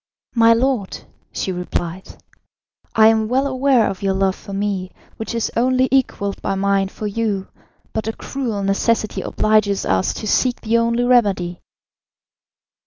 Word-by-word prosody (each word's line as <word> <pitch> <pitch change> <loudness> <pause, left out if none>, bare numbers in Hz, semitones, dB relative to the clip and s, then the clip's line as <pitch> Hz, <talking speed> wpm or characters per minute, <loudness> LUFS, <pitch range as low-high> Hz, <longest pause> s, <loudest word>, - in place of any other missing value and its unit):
"My 230 -1 +6
lord," 245 -5 0 0.3
she 190 - -3
replied, 180 0 -4 0.9
"I 220 - +6
am 220 -1 +2
well 260 +4 +1
aware 260 -3 +2
of 190 - -5
your 195 -1 0
love 190 0 +1
for - - -12
me, 195 -2 -2 0.3
which 225 +1 -5
is 230 - -1
only 255 +2 +2
equalled 220 -7 0
by 195 - -1
mine 195 0 +1
for 210 - -8
you, 205 -2 -2 0.4
but 220 0 -3
a 225 - -1
cruel 230 -8 -4
necessity 215 +3 0
obliges 215 -2 +1
us 95 0 +1
to - - -6
seek 250 +4 +1
the 230 +1 +2
only 235 +1 +1
remedy." 200 -8 +2
215 Hz, 150 wpm, -20 LUFS, 195-235 Hz, 0.9 s, My